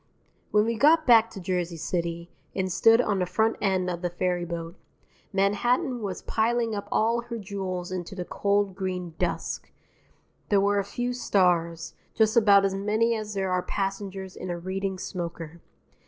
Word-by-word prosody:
When 210 0 +3
we 230 -1 -1
got 315 +2 +5
back 230 -2 +6
to 195 - -9
Jersey 180 -2 -2
City, 170 +1 -3 0.2
and 190 -1 -1
stood 225 +6 +5
on 205 -5 0
the 180 - 0
front 220 +4 +1
end 190 -3 +1
of 175 -1 -3
the 175 - -1
ferryboat, 175 -1 -3 0.6
Manhattan 240 - +1
was 200 -3 -4
piling 230 0 0
up 205 -1 -4
all 230 +2 +2
her 235 -1 -5
jewels 190 -3 -4
into 185 +1 -5
the 180 -2 -4
cold 200 0 0
green 185 -3 -4
dusk. 180 - -2 0.8
There 205 - +4
were 200 +1 +2
a - - 0
few 245 +5 -3
stars, 175 -7 +1 0.2
just 220 -1 +3
about 200 -3 +6
as 195 - 0
many 215 +4 +1
as 215 -2 -4
there 190 -1 -1
are 180 0 +1
passengers 195 -1 -4
in 185 - -6
a 175 - -2
Reading 190 +2 -3
smoker. 170 -3 -6
195 Hz, 170 wpm, -26 LUFS, 180-215 Hz, 0.8 s, back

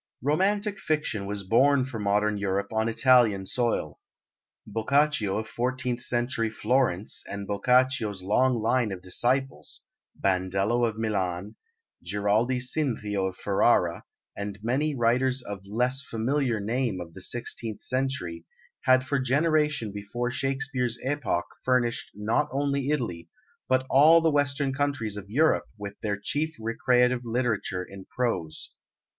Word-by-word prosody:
Romantic 200 +7 +1
fiction 150 - -1
was 100 0 -3
born 130 +6 +4
for 125 -4 -6
modern 105 +1 +1
Europe 100 0 -2
on 110 +1 +1
Italian 115 -5 +4
soil. 120 +4 -1 0.7
Boccaccio 115 -1 +1
of 110 0 -3
fourteenth 125 +1 -2
century 120 -2 0
Florence 110 -4 0
and 100 0 -5
Boccaccio's 115 -1 +1
long 120 +5 +2
line 115 -1 +2
of 90 -1 -7
disciples 130 +8 -1 0.4
Bandello 95 +5 +1
of 110 -1 -5
Milan, 100 -3 -2 0.5
Giraldi 105 +7 +1
Cinthio 115 -7 -1
of 90 - -12
Ferrara, 95 -4 +2 0.3
and 100 0 -5
many 140 +6 0
writers 125 +2 +1
of 100 -3 -6
less 125 +6 0
familiar 120 0 -1
name 115 -1 -1
of 85 -2 -8
the 95 - -10
sixteenth 115 0 -2
century 130 -11 -2 0.4
had 130 0 +5
for 140 +1 0
generations 145 -3 +1
before 120 +5 -3
Shakespeare's 135 -2 -1
epoch 135 - -1 0.2
furnished 125 -2 +1
not 105 +2 0
only 140 0 -1
Italy, 115 - -2 0.4
but 130 0 +2
all 155 +6 +7
the 165 -1 +2
Western 140 -1 +1
countries 135 -7 -1
of 100 -1 -8
Europe 155 +8 +2
with 100 -1 -6
their 105 -1 -1
chief 155 +9 -1
recreative 125 +2 +2
literature 115 -6 -1
in 95 0 -11
prose. 90 -11 -3
120 Hz, 130 wpm, -27 LUFS, 100-135 Hz, 0.7 s, all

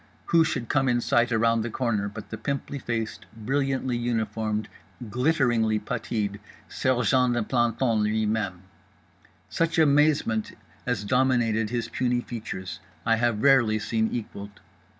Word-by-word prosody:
who 165 -1 +4
should 130 -6 -2
come 135 0 +2
in 120 0 +2
sight 120 0 +2
around 115 0 +2
the 115 - -3
corner 110 -4 -1
but 105 +1 -10
the - - -3
pimply 140 0 -4
faced 115 -3 -4
brilliantly 135 +2 -1
uniformed 110 -2 -1 0.4
glitteringly 120 -4 +2
putteed 105 -3 -3 0.3
sergeant 125 0 +2
de 120 - +1
plantons 120 -1 +1
lui 110 +1 +1
même. 105 -4 -2 0.9
Such 165 0 -1
amazement 145 -7 +3 0.3
as 120 -5 -1
dominated 115 -2 +2
his 120 -1 -2
puny 125 0 0
features 95 -8 -6 0.3
I 115 0 +3
have 115 -2 0
rarely 120 -6 +5
seen 110 +1 0
equalled. 100 -3 -6
115 Hz, 130 wpm, -26 LUFS, 110-130 Hz, 0.9 s, rarely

